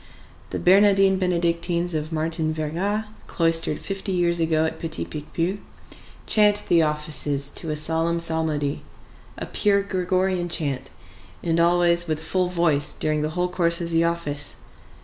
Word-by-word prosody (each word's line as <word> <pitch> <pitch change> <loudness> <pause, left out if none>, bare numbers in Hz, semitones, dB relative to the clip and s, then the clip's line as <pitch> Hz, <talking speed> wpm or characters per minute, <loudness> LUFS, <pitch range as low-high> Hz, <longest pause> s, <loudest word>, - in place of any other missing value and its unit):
The - - -4
Bernardines 195 0 +4
Benedictines 175 -1 0
of 155 0 -3
Martin 160 0 -1
Verga, 175 +8 -2 0.2
cloistered 165 -3 0
fifty 195 0 -5
years 175 -2 +1
ago 160 -1 +1
at 160 0 -4
Petit 160 -1 -3
Picpus, 165 +6 -3 0.7
chant 210 -1 +3
the 170 -1 +5
offices 150 -2 0
to 165 - -6
a 155 - -1
solemn 165 +2 0
psalmody, 160 -3 0 0.6
a - - -5
pure 200 -1 +1
Gregorian 185 -2 -1
chant, 150 -6 -3 0.5
and 165 0 0
always 175 0 +4
with 155 -1 -1
full 180 +3 -1
voice 170 -5 +2
during 155 -1 -1
the 155 - -1
whole 180 0 +1
course 170 -1 +1
of 170 -1 -4
the 165 0 +2
office. 160 -4 -2
170 Hz, 145 wpm, -23 LUFS, 155-180 Hz, 0.7 s, the